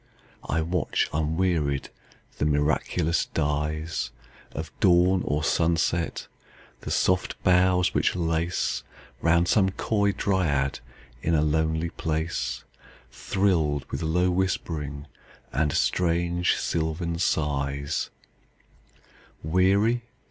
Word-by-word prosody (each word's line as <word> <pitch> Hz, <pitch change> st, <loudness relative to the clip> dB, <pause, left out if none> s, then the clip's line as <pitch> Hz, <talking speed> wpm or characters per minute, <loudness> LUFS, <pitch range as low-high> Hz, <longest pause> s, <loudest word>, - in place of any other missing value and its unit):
I 80 Hz, +3 st, +1 dB
watch, 85 Hz, 0 st, 0 dB
unwearied, 80 Hz, -2 st, 0 dB, 0.5 s
the -, -, +1 dB
miraculous 75 Hz, +3 st, +1 dB
dyesOf 75 Hz, 0 st, -1 dB, 0.7 s
dawn 90 Hz, +1 st, +4 dB
or 75 Hz, +1 st, -1 dB
sunset; 85 Hz, +1 st, +1 dB, 0.5 s
the -, -, -8 dB
soft 90 Hz, 0 st, +1 dB
boughs 90 Hz, 0 st, +3 dB
which -, -, +2 dB
laceRound 85 Hz, 0 st, -1 dB
some 95 Hz, -1 st, +3 dB
coy 100 Hz, +1 st, 0 dB
dryad 75 Hz, -9 st, 0 dB, 0.4 s
in 85 Hz, +3 st, +1 dB
a 75 Hz, -, +3 dB
lonely 80 Hz, +2 st, 0 dB
place, 80 Hz, -6 st, -2 dB, 0.5 s
Thrilled 80 Hz, -8 st, 0 dB
with -, -, -3 dB
low 90 Hz, +3 st, +1 dB
whispering 80 Hz, -6 st, -2 dB, 0.5 s
and 75 Hz, +3 st, +1 dB
strange 85 Hz, +2 st, +1 dB
sylvan 85 Hz, +1 st, -2 dB
sighs:Weary? 80 Hz, -, -2 dB
80 Hz, 85 wpm, -26 LUFS, 75-90 Hz, 0.7 s, dawn